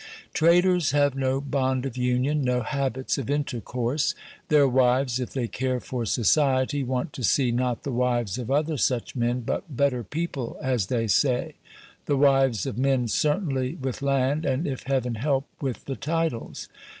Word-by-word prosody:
Traders 175 -2 +3
have 145 -2 +3
no 135 0 0
bond 130 -2 -1
of 130 -3 -4
union, 130 +4 +1
no 125 -1 +1
habits 130 +1 -2
of 130 - -5
intercourse; 125 -1 -1 0.3
their 145 -2 +5
wives, 130 0 +2
if 125 - -3
they 125 -4 -1
care 130 +3 -2
for 120 -2 -4
society, 135 +4 +2
want 130 +2 -2
to 130 - -6
see 125 +2 +3
not 125 0 -1
the 140 - -3
wives 120 -3 0
of 120 -1 -5
other 150 +2 +1
such 125 0 0
men, 120 0 0
but 120 - -2
"better 140 -4 +1
people," 140 - -4
as 125 -7 0
they 115 0 0
say 125 +5 +1 0.5
the 145 - +2
wives 135 -6 +3
of 110 - -4
men 130 -2 +2
certainly 135 - 0
with 130 -1 -4
land, 140 +2 +1
and, 135 +4 0
if 135 -3 -3
Heaven 130 -3 0
help, 135 +4 0 0.2
with 135 -4 -4
the 135 - -4
titles. 160 -6 -3
130 Hz, 165 wpm, -25 LUFS, 125-140 Hz, 0.5 s, their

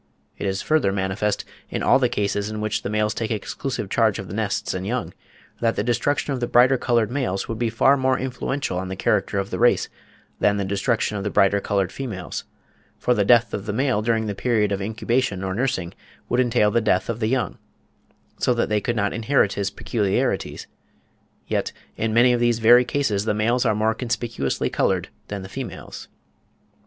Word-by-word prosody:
It - - -4
is 95 0 -2
further 155 -10 +2
manifest, 95 +2 -1 0.2
in - - -3
all - - +5
the 125 -2 +2
cases 100 -3 -1
in 110 0 -5
which 110 -1 -1
the - - -4
males 105 0 +1
take 110 -1 -3
exclusive 115 +2 -3
charge 110 0 +2
of 95 - -6
the - - -6
nests 105 -2 -1
and 95 +1 -4
young, 125 +1 -2 0.5
that 115 -1 +1
the - - 0
destruction 135 +5 0
of 130 - -3
the 120 - -1
brighter 125 +3 +5
coloured 120 -3 +1
males 125 -8 -2
would 115 -1 -4
be 120 -1 +1
far 125 +5 +4
more 130 -1 +2
influential 130 -5 -3
on 95 - -4
the 95 - -4
character 100 +1 0
of 100 0 -2
the - - -3
race, 120 +1 +3 0.5
than 105 0 +3
the 100 - -1
destruction 105 +2 0
of 100 - -4
the 105 - -1
brighter 100 0 +3
coloured 100 -3 0
females; 110 -10 -5 0.5
for 125 - +1
the 105 - +2
death 115 +1 +4
of 100 +2 -4
the 105 - -1
male 130 -2 +1
during 110 0 +1
the 105 - -2
period 105 -1 +1
of 100 0 -1
incubation 110 -1 -1
or 95 0 -2
nursing 105 -6 -1 0.4
would 120 - +1
entail 120 -4 +3
the 115 - +2
death 100 -4 +1
of 115 -1 -3
the 110 - 0
young, 125 +1 -1 0.8
so 125 - +2
that 120 - 0
they 105 -1 +1
could 120 +1 -1
not 105 -3 0
inherit 115 -2 +2
his 100 -1 -1
peculiarities; 100 -1 -1 0.8
yet, - - -1 0.2
in 110 0 -1
many 120 +2 +5
of 120 - +1
these 120 -1 +2
very 120 +2 +6
cases 120 -6 -1
the 105 - +1
males 115 +4 +1
are 105 - +2
more 110 +1 +2
conspicuously 115 - -2
coloured - - 0 0.2
than 100 -2 -5
the - - -7
females. - - -7
110 Hz, 205 wpm, -23 LUFS, 100-120 Hz, 0.8 s, very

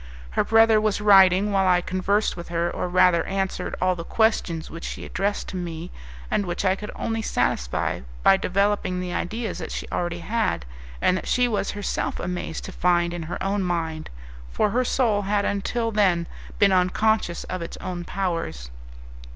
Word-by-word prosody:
Her - - +1
brother 225 -1 +5
was 215 -1 +1
writing 195 -1 +6
while 195 -1 +2
I 180 -1 +5
conversed 185 +4 0
with 170 -1 -8
her, 170 0 0
or - - -3
rather 180 -2 +4
answered 190 -1 -2
all 185 0 +2
the 170 - -6
questions 180 -7 0
which 165 +1 -8
she - - -5
addressed 200 +2 -2
to - - -7
me, 170 -1 -5 0.4
and 205 - +2
which 175 +3 -2
I 190 0 +3
could 210 +2 -7
only 225 0 -2
satisfy 60 - -1 0.2
by 195 - +6
developing 195 -1 0
the 180 -1 -4
ideas 220 +1 -3
that 160 - -6
she - - -4
already 175 0 -2
had, 215 - -1 0.4
and 185 - +4
that - - -6
she 250 0 +3
was 210 -4 -1
herself 205 - -2
amazed 180 -2 -4
to - - -7
find 175 -1 +1
in 175 - -4
her 175 - -3
own 195 +1 0
mind, 165 -3 -2 0.4
for 205 - +1
her 250 +4 +2
soul 230 -5 +1
had 205 +1 0
until 225 +3 -1
then 185 -5 +2 0.3
been 200 -1 +5
unconscious 185 0 +1
of 185 -1 -5
its 170 - -6
own 180 -2 -5
powers. 165 - -3
185 Hz, 180 wpm, -24 LUFS, 175-205 Hz, 0.4 s, writing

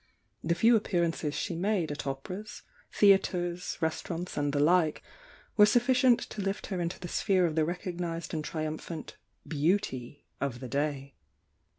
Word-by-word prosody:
The 170 +1 +1
few 230 +6 +5
appearances 170 -7 0
she 165 +3 -2
made 180 -2 0
at 145 - -5
operas, 180 +10 -6 0.3
theatres, 180 -3 +2
restaurants 165 +2 -3
and 145 0 0
the 145 - 0
like 160 +1 +3 0.5
were 210 -1 +8
suf 240 +3 +3
ficient 255 -2 +4
to 210 - -5
lift 195 +1 -2
her 180 - -1
into 170 +1 -3
the 175 - -6
sphere 185 0 +2
of 165 - 0
the 155 0 +2
recognised 175 -1 -4
and 155 -1 -2
triumphant 155 +1 -5 0.3
"beauty" 145 -5 -1
of 135 -4 -2
the 130 - -6
day. 140 +1 -2
170 Hz, 155 wpm, -30 LUFS, 150-190 Hz, 0.5 s, were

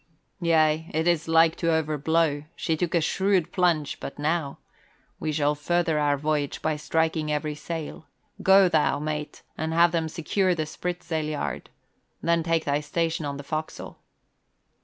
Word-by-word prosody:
"Yea, 160 -1 +2
it 160 +2 +1
is 170 -2 +1
like 165 0 +4
to 165 - 0
over 155 -1 0
blow. 150 0 +1
She 160 - -1
took 175 +2 -1
a 170 - +3
shrewd 190 +1 +1
plunge 170 -5 +1
but - - -7
now. 150 -1 -1 0.6
We 155 - -2
shall 145 -1 +1
further 160 +1 0
our 145 -1 +2
voyage 150 -1 -1
by 155 -1 -1
striking 160 0 0
every 150 0 -1
sail. 155 +1 -6 0.3
Go 190 0 +6
thou, 160 -4 +2
mate, 150 0 -4 0.2
and 160 +1 -2
have 170 0 +5
them 165 -1 -1
secure 180 +4 0
the 155 -2 -2
spritsail 170 0 -3
yard, 150 - -4 0.5
then 170 0 +1
take 165 0 0
thy 145 0 +1
station 160 +1 -2
on 140 -1 -4
the 140 - -7
forecastle." 155 +2 -5
160 Hz, 160 wpm, -26 LUFS, 150-170 Hz, 0.6 s, Go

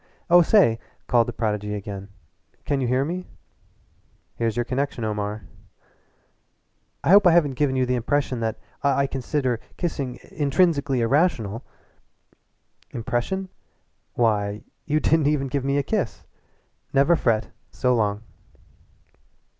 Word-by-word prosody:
"Oh, 175 0 +8
say!" 165 - +4 0.3
called 120 -1 +3
the - - -2
prodigy 105 -2 -2
again. 100 -1 -7 0.6
"Can 140 -2 0
you 125 - 0
hear 130 +3 +1
me?" 180 +4 -4 1.1
"Here's 115 -2 -1
your 120 - +2
connection 130 -1 -2
Omar." 105 0 -3 1.6
"I - - +3
hope 200 -1 +8
I - - +7
haven't 155 -5 +3
given 130 0 0
you 130 -1 +2
the 125 - 0
impression 130 +1 0
that 110 -1 -2 0.2
I 140 0 +2
consider 130 -2 -1 0.2
kissing 140 -8 -3
intrinsically 145 -3 +1
irrational." 115 - +1 1.3
"Impression? 120 - -2 0.7
Why, 105 -3 0 0.2
you 155 +1 +2
didn't 155 -1 +2
even 140 -3 0
give 140 0 -1
me 140 +1 0
the 140 - +1
kiss! 190 - -2 0.7
Never 140 +5 +4
fret 115 -7 0 0.2
so 125 -1 +1
long." 105 -2 0
130 Hz, 125 wpm, -24 LUFS, 115-145 Hz, 1.6 s, Oh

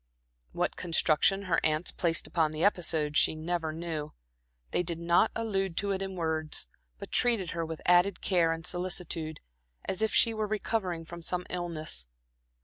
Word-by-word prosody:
What - - -1
construction 175 +3 +2
her 175 -4 +2
aunts 155 +2 +2
placed 170 -2 -1
upon 160 -3 +1
the 155 +2 -2
episode 160 -6 +3
she - - +4
never 160 0 -2
knew. 160 -2 -4 0.6
They - - +1
did 170 -1 -3
not 170 +5 +3
allude 195 -6 -1
to 200 0 0
it 195 0 -1
in 190 -1 -4
words, 160 - -2 0.3
but - - -9
treated 230 -8 +2
her 165 0 -2
with 160 -1 -6
added 180 +2 +4
care 170 -4 +2
and 165 0 -4
solicitude, 175 -3 -2 0.4
as 190 - -2
if 220 - +2
she 230 - +4
were 215 -1 -2
recovering 200 -5 -2
from 170 +1 -9
some 180 +1 -2
illness. 155 - -3
170 Hz, 165 wpm, -30 LUFS, 160-190 Hz, 0.6 s, she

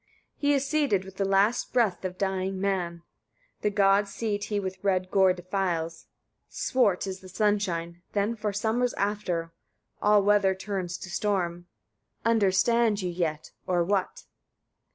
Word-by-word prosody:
33. 285 - 0
He 290 - +5
is 275 0 0
sated 275 -10 +1
with 190 0 -12
the 195 - +1
last 195 +5 +2
breath 215 -8 +1
of 185 -1 -4
dying 190 -1 -1
men; 180 -4 -1 0.6
the 210 - +2
god's 200 0 +3
seat 205 -2 -2
he 205 -1 -1
with 190 -1 -5
red 185 -2 0
gore 190 -1 +5
defiles: 180 -2 -2 0.4
swart 205 -9 +1
is 190 -1 -5
the 185 - -13
sunshine 180 -4 -1
then 210 +3 0
for 215 -2 -2
summers 225 +4 0
after; 185 -5 -2 0.5
all 210 -1 +5
weather 200 -2 +3
turns 185 -2 -4
to 185 - -9
storm. 175 -4 -1 0.6
Understand 220 0 +3
ye 180 - -1
yet, 165 -3 -3 0.2
or 175 -2 +2
what? 195 +1 -1
195 Hz, 150 wpm, -27 LUFS, 185-210 Hz, 0.6 s, He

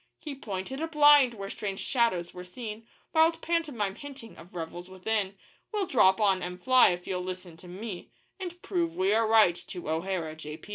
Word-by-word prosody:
He 300 - -7
pointed 230 +2 -5
a 325 - -1
blind 290 -5 +6
where 195 -1 -6
strange 195 -2 -4
shadows 230 -9 0
were 180 - -8
seen 220 +4 -8 0.3
Wild 325 +1 +4
pantomime 290 - -1
hinting 265 -1 -10
of 180 +3 -15
revels 175 +2 -6
within 195 +1 -2 0.3
'We'll 415 -3 0
drop 215 - +4
on 195 -3 +3
M'Fly, 245 +9 +4
if 175 0 -3
you'll 180 -1 -2
listen 180 -2 -7
to 180 - -14
me, 190 +1 -7 0.3
And 355 -2 -6
prove 340 -3 -1
we 190 +2 +2
are 225 0 +3
right 220 -5 +6
to 175 -2 -8
O'Hara, 165 -1 -2
J. 155 0 -8
205 Hz, 180 wpm, -29 LUFS, 180-265 Hz, 0.3 s, blind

